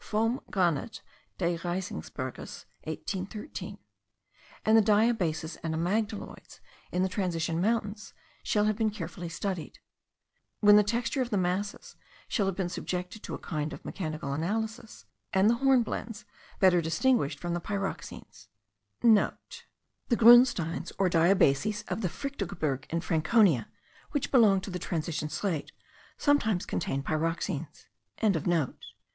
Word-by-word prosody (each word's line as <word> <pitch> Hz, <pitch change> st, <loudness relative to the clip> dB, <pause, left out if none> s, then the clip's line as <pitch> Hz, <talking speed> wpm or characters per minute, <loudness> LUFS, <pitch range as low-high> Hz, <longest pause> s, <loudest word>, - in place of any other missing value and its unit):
(Vom 225 Hz, +4 st, 0 dB
Granite 180 Hz, +2 st, 0 dB, 0.3 s
des 170 Hz, -2 st, 0 dB
Riesengebirges, 175 Hz, -, -5 dB, 0.2 s
1813.) 190 Hz, -, -5 dB, 0.9 s
and 220 Hz, -, +5 dB
the 225 Hz, -, +8 dB
diabases 200 Hz, -7 st, +1 dB
and 160 Hz, -1 st, -2 dB
amygdaloids 205 Hz, +6 st, -3 dB, 0.3 s
in 180 Hz, -, +1 dB
the -, -, +2 dB
transition 170 Hz, -4 st, -1 dB
mountains, 210 Hz, 0 st, -1 dB, 0.3 s
shall 210 Hz, -1 st, +1 dB
have 215 Hz, 0 st, +2 dB
been 220 Hz, 0 st, +1 dB
carefully 175 Hz, -4 st, -6 dB
studied; 175 Hz, 0 st, -4 dB, 0.8 s
when 205 Hz, -1 st, +7 dB
the 210 Hz, -, +8 dB
texture 235 Hz, +5 st, -1 dB
of 250 Hz, -, -1 dB
the 210 Hz, -, 0 dB
masses 185 Hz, +3 st, -2 dB, 0.3 s
shall 200 Hz, -5 st, 0 dB
have 195 Hz, -, -1 dB
been 190 Hz, -2 st, -1 dB
subjected 180 Hz, +3 st, -4 dB
to -, -, -5 dB
a -, -, -6 dB
kind 155 Hz, -2 st, -4 dB
of -, -, -10 dB
mechanical 155 Hz, -6 st, -4 dB
analysis, 220 Hz, -, -3 dB, 0.3 s
and 195 Hz, +3 st, +5 dB
the 235 Hz, -, +1 dB
hornblendes 240 Hz, -5 st, +1 dB, 0.3 s
better 180 Hz, -2 st, +5 dB
distinguished 165 Hz, -, +1 dB
from 175 Hz, +1 st, -3 dB
the 175 Hz, -, -2 dB
pyroxenes,* 200 Hz, +1 st, -5 dB, 0.4 s
(* -, -, -51 dB
The 230 Hz, +2 st, 0 dB
grunsteins 230 Hz, -8 st, +5 dB
or 190 Hz, -2 st, +2 dB
diabases 190 Hz, +3 st, +3 dB
of -, -, -2 dB
the 185 Hz, -, 0 dB
Fichtelgebirge, 160 Hz, -, -3 dB
in 165 Hz, +1 st, -1 dB
Franconia, 165 Hz, -, +3 dB, 0.5 s
which 290 Hz, -, -1 dB
belong 215 Hz, -7 st, +5 dB
to 195 Hz, -, -7 dB
the 180 Hz, -, -4 dB
transition 160 Hz, -3 st, -3 dB
slate, 160 Hz, 0 st, -2 dB, 0.5 s
sometimes 220 Hz, -, +2 dB
contain 135 Hz, +9 st, -2 dB
pyroxenes.) 160 Hz, 0 st, -2 dB
190 Hz, 130 wpm, -29 LUFS, 165-215 Hz, 0.9 s, the